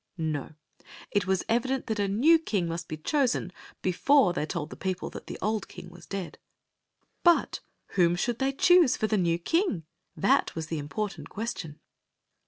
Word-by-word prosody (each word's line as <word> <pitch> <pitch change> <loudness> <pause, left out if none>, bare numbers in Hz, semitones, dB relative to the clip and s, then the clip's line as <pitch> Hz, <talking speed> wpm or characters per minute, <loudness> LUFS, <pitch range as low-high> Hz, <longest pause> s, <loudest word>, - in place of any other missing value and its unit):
No; 155 -3 -3 0.6
it 200 -3 +1
was 190 -1 +1
evident 255 +3 0
that 220 -2 -2
a 200 - +1
new 280 +12 +5
king 200 - -1
must 165 0 -4
be 155 - -5
chosen 245 - 0 0.3
before 190 +3 +4
they 155 -3 -2
told 160 -3 -4
the - - -7
people 185 -1 -3
that - - -9
the - - -6
old 215 -1 -1
king 180 - -11
was 175 - -14
• - - -36
dead. 195 -3 -5 0.8
But 345 -1 +3 0.3
whom 175 -2 +3
should 235 +6 -1
they 270 0 +1
choose 340 +1 +5
for - - 0
the 215 - +1
new 170 -4 +2
king? 240 - 0 0.3
That - - +2
was 160 -1 -4
the 160 - -2
important 195 +8 -4
question. 200 -8 -5
195 Hz, 180 wpm, -28 LUFS, 170-240 Hz, 0.8 s, new